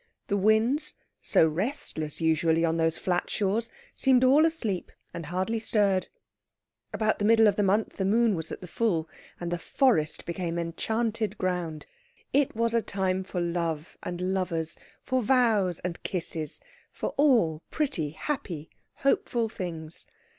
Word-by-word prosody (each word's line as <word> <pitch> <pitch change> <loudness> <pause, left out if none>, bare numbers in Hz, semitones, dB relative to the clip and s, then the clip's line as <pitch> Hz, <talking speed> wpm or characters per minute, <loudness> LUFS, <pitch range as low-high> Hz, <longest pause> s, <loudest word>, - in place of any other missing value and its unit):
The 200 - +2
winds, 220 +8 +2 0.3
so 160 - +4
restless 160 - -3
usually 165 0 +2
on 165 0 +1
those 165 0 +1
flat 180 -1 -1
shores, 215 +3 0 0.2
seemed 260 -1 +4
all 285 +5 +6
asleep, 225 - -2 0.2
and 170 -3 -6
hardly 190 +7 -1
stirred. 200 -4 +2 0.8
About 215 -1 0
the 205 - 0
middle 225 +1 +6
of 205 -2 +4
the 210 - +1
month 205 +2 +1
the 195 - 0
moon 225 +2 +3
was 160 -3 -4
at - - -6
the 180 - -8
full, 180 -6 0 0.3
and 175 0 -4
the 175 - -1
forest 165 - +1
became 170 -1 -3
enchanted 215 +5 -1
ground. 180 -5 -2 0.5
It 280 -3 +2
was 230 +1 +1
a 230 - +3
time 190 -2 -1
for 185 -1 -4
love 170 -2 -2
and 180 +1 -2
lovers, 165 -4 -1 0.3
for 260 -1 0
vows 215 -7 +3
and 175 -2 -4
kisses, 165 -4 -4 0.3
for - - -3
all 230 - +3
pretty, 260 - -1
happy, 165 - -4 0.3
hopeful 240 -4 +1
things. 165 -5 -6
190 Hz, 150 wpm, -28 LUFS, 165-225 Hz, 0.8 s, all